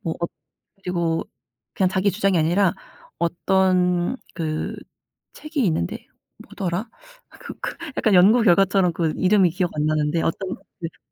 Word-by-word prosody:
뭐 165 -6 -3
엇 170 - -2 0.5
그리고 170 -2 -1 0.5
그냥 190 - +2
자기 190 +1 +1
주장이 195 -2 +1
아니라 175 +4 +3 0.5
어떤 180 +3 +1 0.2
그 155 -2 -3 0.6
책이 305 -4 -3
있는데 120 - -2 0.4
뭐더라 185 +4 -4 0.4
아 - - -17
그 - - -9
그 - - -4 0.2
약간 215 - +2
연구 205 +7 +6
결과처럼 190 -2 +4
그 165 -2 0
이름이 190 -1 +4
기억 180 +1 -1
안 150 0 0
나는데 155 +1 +1
어떤 185 +3 -2 0.2
그 165 -1 -7
180 Hz, 270 characters per minute, -22 LUFS, 165-195 Hz, 0.6 s, 연구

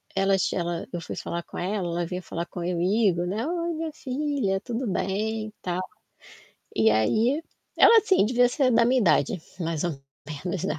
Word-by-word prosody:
elas 195 -1 +2
ela 170 -1 -2
eu 175 - -3
fui - - -6
falar 170 - -4
com - - -10
ela, 185 0 -2
ela 170 0 -1
veio 180 +2 -4
falar 170 -1 -5
comigo, 180 +2 0
né, 210 +9 -2
"Oi 340 0 -2
minha 320 0 -4
filha, 265 -9 -1
tudo 245 +1 -3
bem 215 +3 -1
e 215 - -12
tal". 180 0 -1 0.9
E 110 0 +4
aí, 220 - +2 0.4
ela 460 - +8
assim 395 - +3
devia 245 +1 +4
ser 260 0 +2
da 235 0 +5
minha 255 +2 +3
idade, 175 - +2 0.2
mais 165 -2 -2
ou 175 - 0 0.5
menos, 180 -1 -2
né. 190 - -2
195 Hz, 180 wpm, -26 LUFS, 175-245 Hz, 0.9 s, ela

